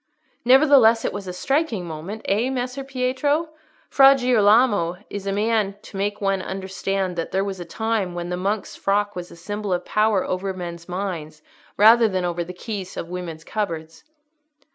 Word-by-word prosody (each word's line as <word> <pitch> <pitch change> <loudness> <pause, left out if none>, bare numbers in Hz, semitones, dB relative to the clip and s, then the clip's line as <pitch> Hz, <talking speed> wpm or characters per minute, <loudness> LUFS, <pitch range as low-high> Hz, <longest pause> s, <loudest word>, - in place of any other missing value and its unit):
"Nevertheless 255 -3 +6
it - - -1
was 200 -2 -6
a - - -3
striking 235 - -1
moment, 170 +7 -7
eh, 220 +6 +1
Messer 255 +1 -3
Pietro? 270 +4 0 0.4
Fra 275 0 +7
Girolamo 215 -7 +3
is 200 -1 -5
a - - 0
man 210 -1 0
to - - -12
make 205 +1 -2
one 195 -2 0
understand 190 0 -3
that 165 - -2
there 190 +1 +1
was 195 -2 -4
a 175 - -6
time 215 -1 -2
when 175 0 -4
the 180 - -1
monk's 200 +3 -2
frock 205 +1 0
was 180 -1 -6
a - - -12
symbol 205 +4 -5
of 180 0 -1
power 215 -2 +2
over 190 +1 -3
men's 170 -1 -7
minds 170 -5 -5 0.3
rather 225 +3 +7
than 185 -3 -1
over 175 0 -2
the 175 - -8
keys 190 0 -6
of 165 - -5
women's 175 -3 -6
cupboards." 165 -6 -4
200 Hz, 175 wpm, -23 LUFS, 180-225 Hz, 0.4 s, Fra